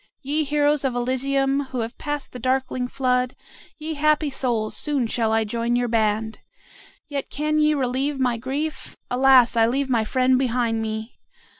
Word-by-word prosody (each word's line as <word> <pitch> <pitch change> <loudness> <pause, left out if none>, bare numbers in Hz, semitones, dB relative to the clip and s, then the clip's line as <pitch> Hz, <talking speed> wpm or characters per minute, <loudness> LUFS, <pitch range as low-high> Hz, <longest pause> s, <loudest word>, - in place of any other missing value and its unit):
Ye 295 +3 0
heroes 295 0 +1
of 260 -3 -1
Elysium, 270 +3 0
who 260 -2 -4
have 230 +2 -5
passed 295 -2 -4
the 250 - -8
darkling 255 0 -1
flood, 250 -1 0 0.4
ye 315 0 -4
happy 305 0 +2
souls, 235 -5 -1
soon 285 -5 +1
shall 225 -1 0
I 225 0 +2
join 235 +2 -1
your 245 0 +1
band. 220 -1 0 0.7
Yet 280 -2 -4
can 305 +2 0
ye 305 0 +3
relieve 270 +1 -1
my 250 -3 +1
grief? 280 +6 -4
Alas, 255 -1 +5
I 225 -1 +4
leave 265 +2 -1
my 230 -3 +2
friend 255 +3 +2
behind 235 -3 0
me. 220 +1 -5
255 Hz, 165 wpm, -23 LUFS, 235-280 Hz, 0.7 s, Alas